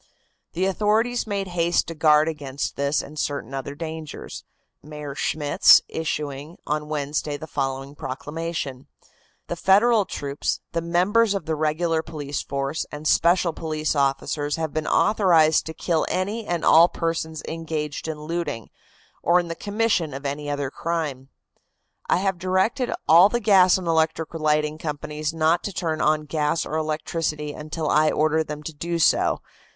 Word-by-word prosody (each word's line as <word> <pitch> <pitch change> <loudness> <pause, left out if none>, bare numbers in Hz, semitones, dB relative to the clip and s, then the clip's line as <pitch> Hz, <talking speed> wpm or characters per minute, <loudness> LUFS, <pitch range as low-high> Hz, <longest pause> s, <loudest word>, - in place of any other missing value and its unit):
The 185 +3 0
authorities 220 +5 +1
made 200 -2 -2
haste 170 -1 +1
to 165 - -6
guard 155 -1 +4
against 140 -3 -4
this 140 +1 0
and 150 +1 -9
certain 140 -2 -3
other 135 +1 -5
dangers, 160 -1 -7 0.4
Mayor 150 -1 -7
Schmitz 145 +1 +5
issuing 150 0 -4
on 150 0 -2
Wednesday 145 0 -2
the 155 - -8
following 135 -2 -3
proclamation: 145 0 -5 0.6
"The 175 - -4
Federal 205 +4 +4
troops, 140 -4 -3
the 165 - -1
members 195 +6 +2
of 195 - -3
the 160 - -1
regular 160 +2 0
police 150 -3 -5
force 140 +3 -3
and 150 +1 -5
special 170 +1 +3
police 155 -1 -2
officers 145 +1 0
have 160 -2 -3
been 155 -1 -2
authorized 165 -8 +3
to 160 - -5
kill 165 -3 0
any 205 +4 -2
and 175 -2 -1
all 170 +2 +7
persons 160 -1 -3
engaged 160 -2 -4
in 155 -1 -5
looting 160 -8 -4 0.5
or 175 +1 +4
in 175 -1 -4
the - - -2
commission 205 - 0
of 140 +1 -8
any 145 +1 -3
other 145 -2 -2
crime. 150 -6 -3 0.8
"I - - +4
have 190 -1 -1
directed 190 +8 0 0.2
all 170 +6 +8
the 240 - 0
gas 195 -5 +5
and 185 - -6
electric 160 -1 0
lighting 155 -1 0
companies 150 0 -4
not 165 +1 +1
to 200 - -2
turn 165 -4 -2
on 155 0 +2
gas 150 +1 0
or 155 - -4
electricity 155 -1 -2
until 155 +1 -5
I 155 +1 +4
order 155 +1 +2
them 150 -1 -7
to 160 - -6
do 170 +3 -3
so. 165 - +2
160 Hz, 155 wpm, -24 LUFS, 150-170 Hz, 0.8 s, all